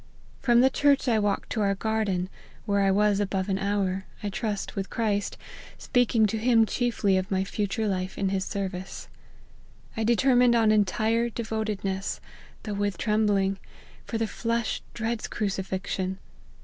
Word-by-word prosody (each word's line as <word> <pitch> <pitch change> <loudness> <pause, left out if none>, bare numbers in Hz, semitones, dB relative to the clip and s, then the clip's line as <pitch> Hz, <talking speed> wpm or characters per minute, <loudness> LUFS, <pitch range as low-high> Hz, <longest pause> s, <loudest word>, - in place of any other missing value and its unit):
From 240 -2 +5
the 265 +1 +5
church 280 -1 +3
I 225 -3 +3
walked 205 -1 -1
to 220 - 0
our 200 -1 +2
garden, 205 -4 -1 0.4
where 200 -2 +1
I 195 - +3
was 205 +1 +3
above 195 -1 -1
an 190 0 0
hour, 195 -1 -1 0.2
I 205 - -1
trust 210 -1 -3
with 195 0 -3
Christ, 205 -3 -1 0.4
speaking 245 -3 +2
to 215 +1 -1
him 230 -1 +4
chiefly 220 -5 +1
of 185 +2 -2
my 190 -2 +1
future 210 +3 -2
life 185 -1 -2
in 195 - 0
his 190 -1 0
service. 190 -2 -5 0.9
I 225 - -1
determined 245 +1 +4
on 225 -2 +4
entire 220 +3 +2
devotedness, 215 -4 -3 0.4
though 210 - -4
with 200 -2 -1
trembling; 205 -3 +1 0.4
for 230 - -3
the 225 - 0
flesh 230 +1 -2
dreads 230 0 -2
cruci 200 -3 -2
fixion. 190 0 -3
210 Hz, 155 wpm, -27 LUFS, 195-225 Hz, 0.9 s, From